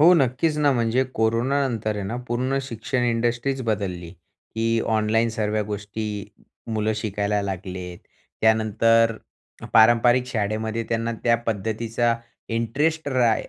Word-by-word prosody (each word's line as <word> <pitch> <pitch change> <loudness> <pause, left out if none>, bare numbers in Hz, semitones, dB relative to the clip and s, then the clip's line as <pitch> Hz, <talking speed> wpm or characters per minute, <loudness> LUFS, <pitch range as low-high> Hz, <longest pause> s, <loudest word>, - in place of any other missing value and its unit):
हो, 170 +4 +8
नक्कीच 145 +2 +1
ना, 145 -1 +4
म्हणजे 120 +1 +1
कोरोनानंतर 115 0 0
आहे 100 - -3
ना, 115 - -3
पूर्ण 130 +3 0
शिक्षण 125 0 -3
इंडस्ट्रीच 120 +3 0
बदलली 95 -7 -3
की 115 +6 -3 0.2
ऑनलाईन 110 +2 +2
सर्व्या 110 -1 -1
गोष्टी 105 +1 -4 0.7
मुलं 110 0 +1
शिकायला 105 -1 -1
लागले. 90 -2 -5 0.4
त्यानंतर 110 +1 +3 0.6
पारंपरिक 120 +2 +5
शाळेमध्ये 110 -1 -2
त्यांना 115 0 -1
त्या 115 -1 +4
पद्धतीचा 115 +2 0 0.4
इंटरेस्ट 145 +7 0
रा 125 -4 +3
115 Hz, 115 wpm, -23 LUFS, 110-120 Hz, 0.7 s, हो